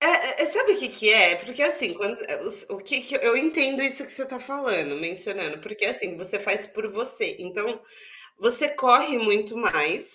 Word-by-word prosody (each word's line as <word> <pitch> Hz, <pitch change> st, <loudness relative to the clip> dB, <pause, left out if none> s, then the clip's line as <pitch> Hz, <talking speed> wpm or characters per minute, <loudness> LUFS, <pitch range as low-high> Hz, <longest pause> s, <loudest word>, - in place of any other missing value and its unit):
Eh 325 Hz, -2 st, +3 dB
eh, -, -, +1 dB
sabe 430 Hz, +7 st, +3 dB
o -, -, -4 dB
que -, -, -4 dB
que 215 Hz, -, 0 dB
é? 180 Hz, -5 st, +8 dB
É -, -, +1 dB
porque, 250 Hz, +10 st, -6 dB
assim, 295 Hz, -10 st, +1 dB
quando 205 Hz, +3 st, -5 dB, 0.5 s
o -, -, -8 dB
que 260 Hz, +8 st, -2 dB
que 260 Hz, +1 st, -3 dB
eu 235 Hz, -3 st, +2 dB
entendo 275 Hz, -1 st, +1 dB
isso 275 Hz, +1 st, +1 dB
que -, -, -7 dB
você 265 Hz, 0 st, -3 dB
tá 255 Hz, -1 st, -10 dB
falando, 260 Hz, -, -3 dB
mencionando. 180 Hz, 0 st, -6 dB
Porque 215 Hz, +3 st, -3 dB
assim, 180 Hz, -, -3 dB
você 185 Hz, +3 st, -5 dB
faz 200 Hz, 0 st, -2 dB
por 220 Hz, +2 st, -7 dB
você 435 Hz, -, -2 dB
então, 210 Hz, +5 st, -6 dB, 0.6 s
você 380 Hz, -11 st, +5 dB
corre 260 Hz, -1 st, +3 dB
muito 210 Hz, 0 st, 0 dB
mais 225 Hz, -, 0 dB
245 Hz, 195 wpm, -23 LUFS, 200-285 Hz, 0.6 s, é